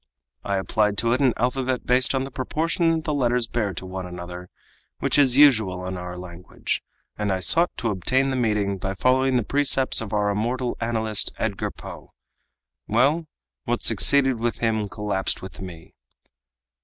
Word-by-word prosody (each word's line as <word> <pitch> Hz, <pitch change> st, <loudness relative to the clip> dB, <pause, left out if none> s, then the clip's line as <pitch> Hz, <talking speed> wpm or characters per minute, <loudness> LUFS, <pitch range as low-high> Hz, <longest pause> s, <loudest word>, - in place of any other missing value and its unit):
I 100 Hz, -1 st, -1 dB
applied 105 Hz, +1 st, 0 dB
to 115 Hz, +2 st, +1 dB
it 130 Hz, -, 0 dB
an 130 Hz, -4 st, +3 dB
alphabet 125 Hz, +1 st, -1 dB
based 125 Hz, +2 st, +4 dB
on 130 Hz, -, 0 dB
the 135 Hz, -, -7 dB
proportion 165 Hz, +5 st, -1 dB
the 155 Hz, -, -2 dB
letters 125 Hz, -3 st, +1 dB
bear 115 Hz, -3 st, -2 dB
to 95 Hz, -, -6 dB
one 95 Hz, 0 st, -6 dB
another 90 Hz, 0 st, -8 dB, 0.5 s
which -, -, +1 dB
is 130 Hz, -3 st, +4 dB
usual 110 Hz, -11 st, +4 dB
in 95 Hz, 0 st, -4 dB
our 90 Hz, 0 st, -7 dB
language, 90 Hz, 0 st, -5 dB, 0.4 s
and 105 Hz, -1 st, 0 dB
I 95 Hz, -, 0 dB
sought 170 Hz, -, +4 dB
to 115 Hz, -, -1 dB
obtain 130 Hz, +8 st, +1 dB
the -, -, -1 dB
meaning 105 Hz, -5 st, 0 dB
by 95 Hz, +1 st, -3 dB
following 130 Hz, +4 st, +2 dB
the 120 Hz, -, 0 dB
precepts 135 Hz, 0 st, +2 dB
of 110 Hz, -3 st, -6 dB
our 105 Hz, -1 st, +1 dB
immortal 120 Hz, +4 st, -2 dB
analyst, 110 Hz, -2 st, -1 dB
Edgar 105 Hz, -3 st, -2 dB
Poe. -, -, -11 dB, 0.7 s
Well, 145 Hz, +9 st, +2 dB, 0.4 s
what -, -, -1 dB
succeeded 135 Hz, -4 st, +4 dB
with 120 Hz, 0 st, -1 dB
him 110 Hz, -3 st, -1 dB
collapsed 100 Hz, -1 st, -2 dB
with 95 Hz, -, -9 dB
me." 85 Hz, -3 st, -10 dB
115 Hz, 170 wpm, -23 LUFS, 95-130 Hz, 0.7 s, based